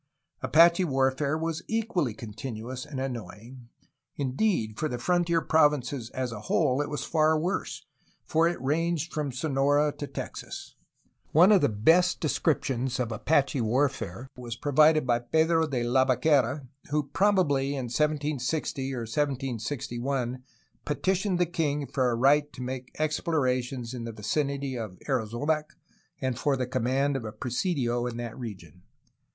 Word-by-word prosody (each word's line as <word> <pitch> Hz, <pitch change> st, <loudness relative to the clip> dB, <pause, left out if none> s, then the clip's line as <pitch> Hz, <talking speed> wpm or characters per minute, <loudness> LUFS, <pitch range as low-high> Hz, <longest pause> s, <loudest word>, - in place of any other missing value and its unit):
Apache 170 Hz, +3 st, +5 dB
warfare 135 Hz, +1 st, +1 dB
was 165 Hz, 0 st, -2 dB
equally 215 Hz, -, -1 dB
continuous 120 Hz, +3 st, -6 dB
and 145 Hz, -3 st, -5 dB
annoying; 120 Hz, -1 st, -7 dB, 0.5 s
indeed, 130 Hz, -, 0 dB
for 155 Hz, -, 0 dB
the 125 Hz, -, -3 dB
frontier 170 Hz, +4 st, +1 dB
provinces 145 Hz, -7 st, +2 dB
as 130 Hz, -2 st, -3 dB
a 110 Hz, -, -6 dB
whole 140 Hz, -3 st, +2 dB
it 145 Hz, -, -3 dB
was 150 Hz, -, -3 dB
far 155 Hz, -1 st, +3 dB
worse, 170 Hz, 0 st, -3 dB, 0.4 s
as -, -, -13 dB, 0.2 s
it 175 Hz, -, -7 dB
ranged 165 Hz, +4 st, 0 dB
from 150 Hz, -3 st, -2 dB
Sonora 145 Hz, +2 st, +2 dB
to 145 Hz, -, -4 dB
Texas. -, -, -7 dB, 0.6 s
One 175 Hz, +7 st, +7 dB
of 200 Hz, -4 st, +6 dB
the -, -, +3 dB
best 165 Hz, -, +3 dB
descriptions 135 Hz, -4 st, 0 dB
of 120 Hz, -2 st, -1 dB
Apache 140 Hz, +3 st, +1 dB
warfare 125 Hz, -2 st, -1 dB
was 120 Hz, -2 st, -6 dB
provided 150 Hz, +3 st, +4 dB
by 120 Hz, -1 st, +2 dB
Pedro 160 Hz, +6 st, +2 dB
de 130 Hz, -5 st, -1 dB
Labaquera, 130 Hz, +2 st, +2 dB, 0.2 s
who, 150 Hz, +1 st, +1 dB
probably 145 Hz, -4 st, +2 dB
in 135 Hz, -, -3 dB
1760 145 Hz, 0 st, -1 dB
or 120 Hz, -, -3 dB
1761, 125 Hz, 0 st, -2 dB, 0.4 s
petitioned 185 Hz, +5 st, 0 dB
the 175 Hz, -, +3 dB
king 150 Hz, -4 st, -1 dB
for 130 Hz, -2 st, 0 dB
a 120 Hz, -, 0 dB
right 145 Hz, +4 st, +3 dB
to 125 Hz, -, -7 dB
make 125 Hz, 0 st, -5 dB
explorations 130 Hz, -6 st, -1 dB
in 120 Hz, -2 st, -5 dB
the 115 Hz, -, -4 dB
vicinity 135 Hz, +5 st, -2 dB
of 110 Hz, -6 st, -6 dB
Arizonac 140 Hz, +5 st, -1 dB, 0.4 s
and 130 Hz, -2 st, -2 dB
for 140 Hz, -2 st, +1 dB
the 130 Hz, -, -1 dB
command 130 Hz, +3 st, 0 dB
of 135 Hz, -, -3 dB
a 110 Hz, -, -5 dB
presidio 125 Hz, -, -1 dB
in 120 Hz, -1 st, -5 dB
that 120 Hz, -1 st, -5 dB
region. 95 Hz, -, -9 dB
135 Hz, 145 wpm, -28 LUFS, 125-155 Hz, 0.6 s, One